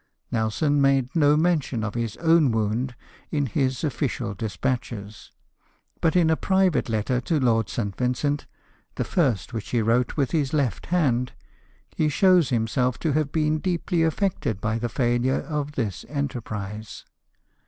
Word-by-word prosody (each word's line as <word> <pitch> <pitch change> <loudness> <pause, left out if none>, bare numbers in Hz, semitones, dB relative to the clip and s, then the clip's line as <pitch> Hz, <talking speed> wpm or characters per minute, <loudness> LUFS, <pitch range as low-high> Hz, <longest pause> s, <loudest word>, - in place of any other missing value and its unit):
Nelson 130 +6 +1
made 135 -1 +2
no 150 -2 +4
mention 155 -8 +1
of 105 -2 -3
his 115 -3 -3
own 165 -3 +4
wound 115 +4 -1 0.3
in 145 -2 0
his 130 +1 -1
official 130 -6 -2
despatches; 105 0 -4 0.7
but 165 0 +2
in 170 -3 +4
a - - +4
private 190 -5 +1
letter 115 +3 0
to 155 +4 0
Lord 115 -4 +2
St. 100 -5 -3
Vincent 135 +4 -1 0.2
— - - -37
the - - -1
first 130 - 0
which 110 -3 -5
he 120 - +1
wrote 115 +5 +1
with 140 -4 +1
his 145 -4 0
left 135 -9 0
hand 130 -8 +1 0.3
— - - -34
he 155 - +2
shows 180 -1 +4
himself 125 +1 0
to 160 - -1
have 150 0 0
been 155 -1 +1
deeply 175 -1 -1
affected 160 - 0
by 115 +2 -1
the 120 +1 -2
failure 120 +2 +1
of 150 -2 -3
this 110 -9 -3
enterprise. 110 -7 -5
130 Hz, 155 wpm, -25 LUFS, 115-155 Hz, 0.7 s, no